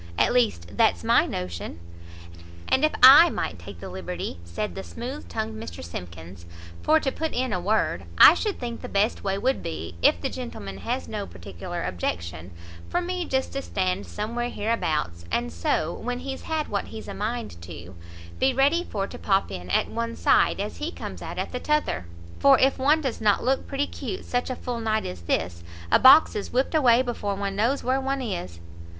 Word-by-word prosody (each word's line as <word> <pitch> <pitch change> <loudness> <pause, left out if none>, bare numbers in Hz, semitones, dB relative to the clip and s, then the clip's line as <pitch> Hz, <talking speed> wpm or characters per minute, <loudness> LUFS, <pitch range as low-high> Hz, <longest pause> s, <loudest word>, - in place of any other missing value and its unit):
At - - +3
least 150 - +1
that's - - +3
my - - +4
notion." 85 -2 -5 0.9
"And 265 - +2
if 310 - +4
I 290 +7 +11
might 85 - -3
take 85 +1 -10
the - - -7
liberty," 90 -1 -5
said 85 +1 -4
the 95 - -5
smooth 85 -1 -7
tongued 110 +4 -4
Mr 85 +3 -8
Simkins, 85 0 -9 0.3
"for 315 +1 +4
to 270 - -1
put 320 +3 -3
in 250 -2 -1
a 180 - 0
word, 210 +5 0
I - - +10
should 420 -3 -2
think 235 -2 -5
the - - -7
best 200 +3 +1
way 195 -1 0
would 260 +6 0
be, 80 +2 -5
if 85 - +4
the - - -2
gentleman 100 - -7
has 90 -2 -3
no - - -4
peticklar 85 0 -7
objection, 85 -1 -4 0.4
for 350 - +1
me 360 0 -3
just 265 -3 -1
to 275 - -2
stand 95 - -2
somewhere 235 - -3
hereabouts, 155 - -2
and 80 0 -1
so, 155 - 0
when 245 +1 -4
he's 270 -1 -5
had 315 -1 -1
what 200 -1 -2
he's 220 - -9
a - - -5
mind 215 - -4
to, 85 +1 -10 0.5
be 265 -1 +2
ready 285 +6 +3
for 200 - -3
to - - -9
pop 195 -1 +1
in 90 0 -7
at - - +2
one 230 0 -3
side, - - +3
as 205 +1 -4
he 305 +3 -3
comes - - -8
out - - -6
at - - -3
the 250 - -3
t'other; 300 - 0 0.3
for 275 -1 +6
if 270 0 +3
one 295 +4 +4
does 265 -6 -3
not 210 -2 +3
look 265 +2 0
pretty 280 +1 -1
'cute 380 - -6
such 245 +1 -1
a 255 - -2
full 245 -1 -4
night 220 -1 0
as 90 -1 -6
this, 85 0 -2 0.3
a - - +6
box 275 +5 +8
is 205 - -3
whipt 260 +5 0
away 255 -5 +5
before 210 -5 -3
one 200 0 -3
knows 235 +7 +1
where 260 +2 +1
one 270 +1 -1
is." 175 - -5
210 Hz, 200 wpm, -25 LUFS, -, 0.9 s, I